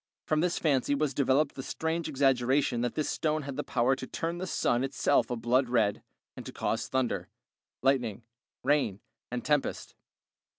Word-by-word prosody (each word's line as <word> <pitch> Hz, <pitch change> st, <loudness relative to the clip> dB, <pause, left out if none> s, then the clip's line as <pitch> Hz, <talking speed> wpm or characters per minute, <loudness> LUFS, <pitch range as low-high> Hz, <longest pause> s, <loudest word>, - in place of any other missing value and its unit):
From 155 Hz, -, +1 dB
this 175 Hz, +2 st, +1 dB
fancy 145 Hz, -2 st, +2 dB
was 145 Hz, -1 st, 0 dB
developed 140 Hz, +2 st, +2 dB
the 135 Hz, -, -6 dB
strange 160 Hz, +4 st, -2 dB
exaggeration 135 Hz, -2 st, +2 dB
that 120 Hz, -1 st, -1 dB
this 155 Hz, -, 0 dB
stone 155 Hz, -1 st, 0 dB
had 140 Hz, -1 st, -5 dB
the 150 Hz, -, -2 dB
power 125 Hz, +3 st, +2 dB
to 130 Hz, -, -6 dB
turn 170 Hz, +1 st, -3 dB
the 185 Hz, -, -3 dB
sun 120 Hz, -6 st, +1 dB
itself 135 Hz, +1 st, +2 dB
a 125 Hz, -, -1 dB
blood 120 Hz, +3 st, +1 dB
red, 110 Hz, -4 st, +2 dB, 0.3 s
and -, -, -8 dB
to -, -, -6 dB
cause -, -, -2 dB
thunder, 130 Hz, -2 st, -1 dB, 0.6 s
lightning, 125 Hz, -5 st, +1 dB, 0.4 s
rain, 140 Hz, -8 st, +2 dB, 0.3 s
and 120 Hz, -1 st, -4 dB
tempest. 150 Hz, -2 st, 0 dB
135 Hz, 170 wpm, -29 LUFS, 125-150 Hz, 0.6 s, fancy